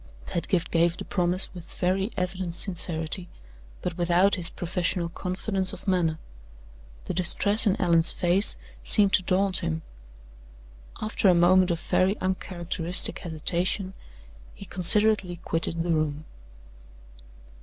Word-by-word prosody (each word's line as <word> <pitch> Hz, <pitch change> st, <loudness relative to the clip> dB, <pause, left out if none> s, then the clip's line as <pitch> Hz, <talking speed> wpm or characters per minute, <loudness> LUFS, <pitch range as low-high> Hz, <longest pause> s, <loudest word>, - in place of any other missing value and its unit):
Pedgift 175 Hz, 0 st, -2 dB
gave 170 Hz, +1 st, +1 dB
the -, -, -7 dB
promise 180 Hz, 0 st, +3 dB
with 175 Hz, -2 st, -12 dB
very 190 Hz, +4 st, -1 dB
evident 180 Hz, -2 st, -3 dB
sincerity, 175 Hz, -1 st, 0 dB, 0.5 s
but 180 Hz, 0 st, -5 dB
without 175 Hz, +3 st, +2 dB
his 175 Hz, -4 st, +1 dB
professional 175 Hz, -1 st, -2 dB
confidence 185 Hz, +2 st, -1 dB
of 190 Hz, -, -11 dB
manner. 170 Hz, -4 st, 0 dB, 0.9 s
The -, -, -4 dB
distress 200 Hz, +5 st, +3 dB
in 195 Hz, -, +1 dB
Allan's 170 Hz, -2 st, +3 dB
face 180 Hz, +4 st, +2 dB, 0.3 s
seemed 200 Hz, -3 st, +4 dB
to -, -, +5 dB
daunt 185 Hz, +1 st, 0 dB
him. 160 Hz, -1 st, -3 dB, 1.2 s
After 215 Hz, -2 st, +1 dB
a 180 Hz, -, +4 dB
moment 180 Hz, +2 st, +4 dB
of 170 Hz, -1 st, -1 dB
very 190 Hz, +4 st, 0 dB
uncharacteristic 180 Hz, -1 st, -3 dB
hesitation, 175 Hz, +4 st, -2 dB, 0.6 s
he -, -, -11 dB
considerately 200 Hz, 0 st, +2 dB
quitted 165 Hz, -1 st, 0 dB
the 170 Hz, -, -2 dB
room. 155 Hz, -1 st, -2 dB
180 Hz, 125 wpm, -25 LUFS, 170-190 Hz, 1.2 s, to